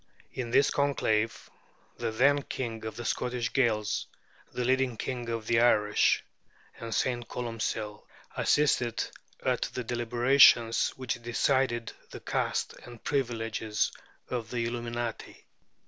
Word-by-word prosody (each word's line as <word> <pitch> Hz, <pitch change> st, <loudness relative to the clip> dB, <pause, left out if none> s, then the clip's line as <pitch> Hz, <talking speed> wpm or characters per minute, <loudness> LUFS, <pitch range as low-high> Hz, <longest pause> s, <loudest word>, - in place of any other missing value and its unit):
In 125 Hz, -2 st, -4 dB
this 140 Hz, +4 st, +4 dB
conclave, 115 Hz, -6 st, 0 dB, 0.5 s
the -, -, -2 dB
then 140 Hz, +6 st, +3 dB
king 115 Hz, -5 st, -5 dB
of 110 Hz, -1 st, -5 dB
the 120 Hz, +1 st, -6 dB
Scottish 125 Hz, 0 st, -1 dB
Gaels, 110 Hz, -5 st, +1 dB, 0.4 s
the 125 Hz, -, -2 dB
leading 130 Hz, -2 st, +1 dB
King 120 Hz, -1 st, -4 dB
of 115 Hz, -1 st, -3 dB
the 115 Hz, +1 st, +3 dB
Irish, 105 Hz, -3 st, +3 dB, 0.6 s
and 115 Hz, 0 st, -6 dB
St. 120 Hz, +2 st, 0 dB
Columcill, 110 Hz, -3 st, -4 dB, 0.3 s
assisted 125 Hz, -6 st, +2 dB, 0.4 s
at -, -, +1 dB
the 125 Hz, -, -2 dB
deliberations 120 Hz, 0 st, +4 dB
which 125 Hz, -2 st, -4 dB
decided 120 Hz, 0 st, +1 dB, 0.2 s
the -, -, -8 dB
caste -, -, -1 dB
and 120 Hz, -2 st, -12 dB
privileges 115 Hz, -5 st, -1 dB, 0.4 s
of 120 Hz, -3 st, -4 dB
the 120 Hz, -1 st, -1 dB
Illuminati. 120 Hz, -1 st, -4 dB
120 Hz, 120 wpm, -29 LUFS, 115-125 Hz, 0.6 s, this